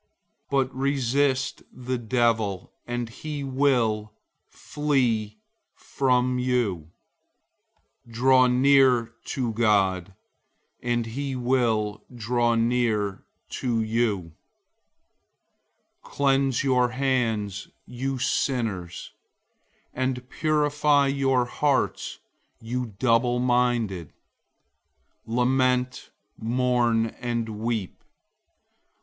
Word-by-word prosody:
But 135 -1 +1
resist 135 0 0
the 125 0 -4
devil, 115 -5 0
and 120 0 -3
he 145 +5 -6
will 125 -6 +1 0.4
flee 120 -8 -1 0.4
from 125 -1 0
you. 115 -11 -1 1.2
004:008 - - -15
Draw 130 +2 +5
near 125 -2 +4
to 120 -4 -2
God, 100 -4 +1 0.7
and 120 -1 0
he 135 +4 -4
will 120 -4 0
draw 120 0 0
near 115 -4 0 0.2
to 120 -3 -1
you. 110 -6 -1 1.7
Cleanse 135 -2 +1
your 125 -2 +2
hands, 120 -6 -1 0.2
you 130 +2 -4
sinners; 110 -9 -2 0.8
and 130 -1 -2
purify 150 -2 +2
your 135 -2 +1
hearts, 140 +2 -1 0.4
you 120 -2 -4
double 120 0 +2
minded. 120 -8 +1 1.2
004:009 115 - -4
Lament, 125 0 +1 0.3
mourn, 120 -1 +1
and 120 -2 -2
weep. 110 -2 -4
125 Hz, 80 wpm, -25 LUFS, 115-130 Hz, 1.7 s, Draw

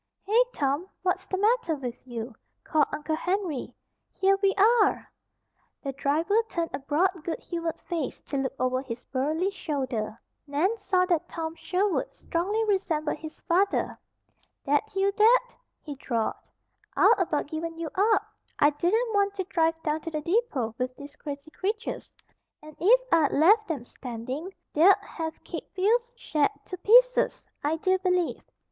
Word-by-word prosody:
"Hey, 435 +5 +4
Tom! 285 - -1 0.2
What's 375 0 0
the 380 - -2
matter 420 -5 +2
with 255 -2 -7
you?" 235 0 -5 0.3
called 305 -2 +2
Uncle 310 +1 -2
Henry. 360 -4 -2 0.4
"Here 390 0 +3
we 390 -1 +3
are!" 420 0 +4 0.8
The 275 - -2
driver 315 - +1
turned 335 -1 -2
a - - -2
broad, 325 +5 0
good 330 - -2
humored 335 -2 -4
face 325 -6 -3
to 280 - -4
look 270 -1 -1
over 255 0 0
his 245 -2 -7
burly 310 +8 -1
shoulder. 260 - -3 0.3
Nan 315 +10 +1
saw 385 -4 +1
that 345 -4 0
Tom 325 -1 -4
Sherwood 375 +3 -1
strongly 405 +7 -1
resembled 335 -8 0
his 315 -1 -9
father. 385 +4 +1 0.7
"That 290 +10 0
you, 390 +1 +2
Dad?" 475 +4 +4 0.3
he 295 - -6
drawled. 235 -5 -1 0.6
"I'd - - +7
about 335 -5 0
given 325 +2 -5
you 330 -2 -4
up. 425 +3 +3 0.3
I 290 - +5
didn't 440 +10 +1
want 400 0 +2
to 380 - -2
drive 330 -2 +1
down 310 0 -1
to 330 - -5
the 305 -2 -3
depot 320 - 0
with 255 0 -2
these 285 +2 -11
crazy 290 +1 -8
creatures. 420 +7 -4 0.5
And 305 -1 -12
if 480 +8 +5
I'd 315 -4 +4
left 410 +8 +5
'em 280 -7 -3
standing 255 +9 -6 0.2
they'd 360 +6 +7
have 320 -1 -6
kicked - - -8
Phil's 465 +5 +2
shed 305 -11 +1 0.2
to 365 - -6
pieces, - - +4 0.2
I 300 +2 +1
do 375 +3 +1
believe. 360 -2 0
335 Hz, 155 wpm, -27 LUFS, 290-395 Hz, 0.8 s, I'd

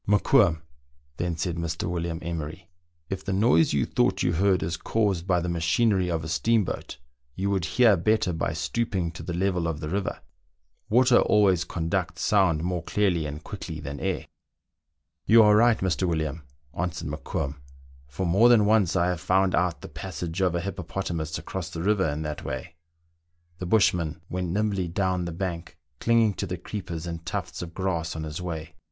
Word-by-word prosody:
Mokoum," 100 -5 +4 0.5
then 85 -1 -2
said 85 -1 -2
Mr. 85 0 -3
William 85 -1 -2
Emery, 85 +1 -5 0.2
" 85 -2 -45
if 95 0 -3
the 100 - -3
noise 95 -5 +4
you 70 -2 +1
thought - - +1
you 85 - +2
heard 95 +1 +2
is 80 +2 -2
caused 95 -1 -1
by 90 -2 +3
the 85 - -3
machinery 90 +3 +2
of 80 -2 -1
a - - -5
steamboat, 100 +6 0 0.4
you 100 +2 -1
would 95 -4 0
hear 110 +5 +5
better 100 +1 +1
by 80 - -1
stooping 95 -7 -1
to 85 - -9
the 85 - -4
level 90 -2 0
of 80 -2 -3
the 75 -1 -5
river; 95 +2 -2 0.7
water 125 +2 +5
always 95 -5 +3
conducts 90 +1 -2
sound 90 -7 +3
more 90 -1 -1
clearly 85 -4 0
and 75 +2 -7
quickly 85 -6 -7
than 70 -1 -6
air." 95 -3 -2 0.5
" 75 0 -56
You 115 0 +8
are 105 0 +6
right, 115 +1 +5
Mr. 95 0 0
William," 80 -2 -2 0.3
answered 90 0 -3
Mokoum, 75 -1 -4 0.3
" 65 0 -24
for 70 +8 -4
more 100 +8 +5
than 115 -4 +6
once 105 -4 +3
I 85 -2 +3
have 90 -3 -2
found 95 0 +2
out 90 -2 +1
the - - -8
passage 90 -1 -5
of 90 -2 +2
a 85 - 0
hippo 90 0 -4
potamus 80 -3 -3
across 85 +3 -5
the 80 - -5
river 100 -4 +2
in 75 +2 -3
that 75 -1 -5
way." 90 - -5 0.9
The 90 - -4
bushman 90 -6 +2
went 90 -1 -2
nimbly 100 -1 0
down 90 0 0
the 85 - -4
bank, 85 -1 -5 0.2
clinging 115 -2 +3
to 100 - -2
the 90 0 -4
creepers 85 -3 -6
and 85 -1 -5
tufts - - -4
oi 85 - -4
grass 85 -2 -2
on 80 - -4
his 75 +2 -5
way. 80 -3 -5
90 Hz, 190 wpm, -26 LUFS, 80-95 Hz, 0.9 s, You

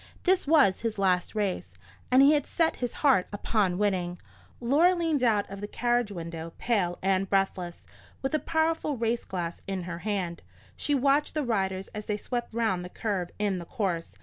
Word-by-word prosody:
This 375 -3 +2
was 285 -11 +5
his 225 -2 -2
last 185 0 +1
race, 205 -3 -2 0.4
and 260 +2 +7
he 285 +2 +7
had 290 -2 +1
set 330 -1 +1
his 245 -2 -2
heart 260 -10 +5
upon 205 -3 0
winning. 185 -4 0 0.4
Laura 305 +10 +4
leaned 325 -5 0
out 215 -5 +2
of 195 0 -8
the 205 - -4
carriage 240 -1 0
window, 165 -2 -6
pale 190 -7 0
and 190 0 +1
breathless, 190 -3 -1 0.4
with 270 - -1
a 310 - +3
powerful 320 -3 0
race 230 +1 -1
glass 170 -2 -4
in 190 -2 -3
her 170 -1 -5
hand. 185 -3 -2 0.3
She 290 - 0
watched 280 +3 +2
the 305 - +1
riders 190 -4 -1
as 210 -1 -7
they 210 - 0
swept 240 +3 -4
round 220 -6 0
the 180 - -7
curve 190 -4 -2
in 205 -3 0
the 170 - -7
course. 185 -7 -3
210 Hz, 185 wpm, -28 LUFS, 185-260 Hz, 0.4 s, and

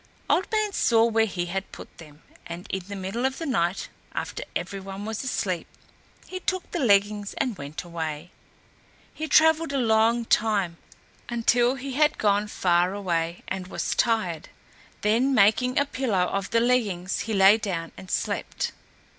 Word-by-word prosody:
Old 375 - +1
Man 430 -2 +1
saw 230 -8 +4
where 225 -1 +2
he 175 -3 -3
had 190 +2 -4
put - - -12
them, 150 -2 -14 0.2
and 170 +2 -7
in 190 - -2
the 200 - -6
middle 195 +5 -3
of 265 0 0
the 330 - -4
night, 185 - 0 0.3
after - - -4
every 195 - -3
one 195 +1 -7
was 220 +2 -4
asleep, 185 -9 -2 0.6
he 370 - -6
took 370 -1 -3
the 350 - -2
leggings 205 -4 +2
and 250 -5 -1
went 145 -1 -7
away. 165 -1 -5 0.8
He 315 - -4
travelled 320 +1 +4
a - - +1
long 230 -1 +3
time, 205 -7 +1 0.5
until 240 +1 +2
he 270 +1 -6
had 300 +2 +3
gone 205 0 +2
far 180 -2 +1 0.5
and 185 -1 -4
was - - -2
tired; 185 -9 0 0.5
then 240 +6 +2
making 245 +4 +4
a 285 - +4
pillow 240 -10 0
of 195 -1 -2
the 230 - +2
leggings 210 -7 +1
he 220 -2 -2
lay 195 +3 +6
down 170 -6 -3
and 190 - -11
slept. - - -2
210 Hz, 165 wpm, -25 LUFS, 185-250 Hz, 0.8 s, lay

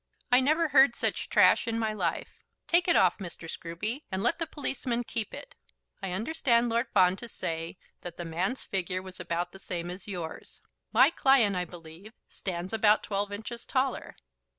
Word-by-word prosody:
I 250 - +7
never 310 +4 +2
heard 270 -3 +6
such - - -1
trash - - +5
in 230 0 -1
my 220 -1 -1
life. 175 -6 -3 0.2
Take 345 +1 +3
it 345 - +4
off, 185 +1 +4
Mr. 175 -3 -7
Scruby, 185 - -4
and 190 +1 -2
let 335 - +1
the 330 - -2
policeman 250 -5 -2
keep 225 -2 -2
it. - - -10 0.5
I 195 - -3
understand 235 - +1
Lord 235 +2 0
Fawn 185 -2 +4
to 235 - -7
say 165 -4 -4 0.2
that 175 -1 -8
the 175 - -5
man's 180 +10 -2
figure 185 -1 -2
was 185 -1 -10
about 175 0 -3
the 195 - -12
same 175 -2 -4
as 185 +3 -8
yours. 175 -5 -6 0.3
My 260 +7 +6
client, 265 - +4
I 180 0 -1
believe, 170 +5 -12 0.2
stands 185 +1 -5
about 215 -1 +4
twelve 200 0 -2
inches 225 +3 -6
taller. 260 -1 -1
205 Hz, 180 wpm, -29 LUFS, 180-245 Hz, 0.5 s, I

